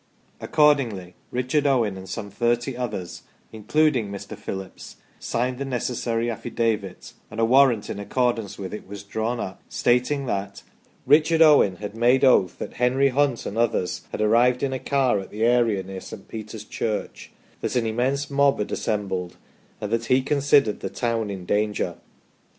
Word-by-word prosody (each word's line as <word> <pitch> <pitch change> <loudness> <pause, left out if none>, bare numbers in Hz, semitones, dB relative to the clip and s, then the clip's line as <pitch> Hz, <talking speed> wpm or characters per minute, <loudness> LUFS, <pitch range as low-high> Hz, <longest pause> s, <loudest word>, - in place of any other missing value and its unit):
Accordingly, 125 -12 +2 0.2
Richard 130 +4 0
Owen 120 -8 +2
and 95 -1 -9
some 100 +2 -5
thirty 120 +4 0
others, 105 -8 -5 0.3
includ 145 +8 +2
ing 110 -5 -1
Mr. 100 +2 -7
Phillips, 95 -2 -8 0.2
signed 125 +2 -2
the - - -1
necessary 120 -3 -2
affidavit, 115 -4 -3 0.2
and 110 - -7
a 115 - +4
warrant 125 -2 +4
in - - -5
ac 100 - -8
cordance 120 -5 0
with 95 -2 -6
it 105 - -7
was 100 0 -8
drawn 110 +4 -2
up, 95 -3 -6
stating 125 +3 +1
that 100 -4 -4 0.2
" - - -35
Richard 155 +4 +5
Owen 145 - +5
had 105 +2 -7
made 125 +4 +3
oath 95 -9 +4
that - - -6
Henry 130 +3 +3
Hunt 135 -2 +1
and 110 - -3
others 115 -6 0
had - - -4
arrived 120 +4 +3
in 135 -1 0
a 130 - -3
car 130 -7 +1
at 95 - -8
the 110 +2 -3
area 115 -4 +3
near 95 0 -7
St. - - -10
Peter's 110 -1 -7
church, 110 0 -4 0.3
that - - -3
an 120 -2 +1
immense 130 +5 0
mob 140 0 +3
had 105 - -3
assembled, 95 -4 -2 0.4
and 105 - -5
that 115 0 0
he 130 +2 +3
considered 140 -5 +3
the - - -4
town 115 -3 -2
in 95 -3 -6
danger". 105 -3 -1
115 Hz, 175 wpm, -24 LUFS, 105-130 Hz, 0.4 s, Richard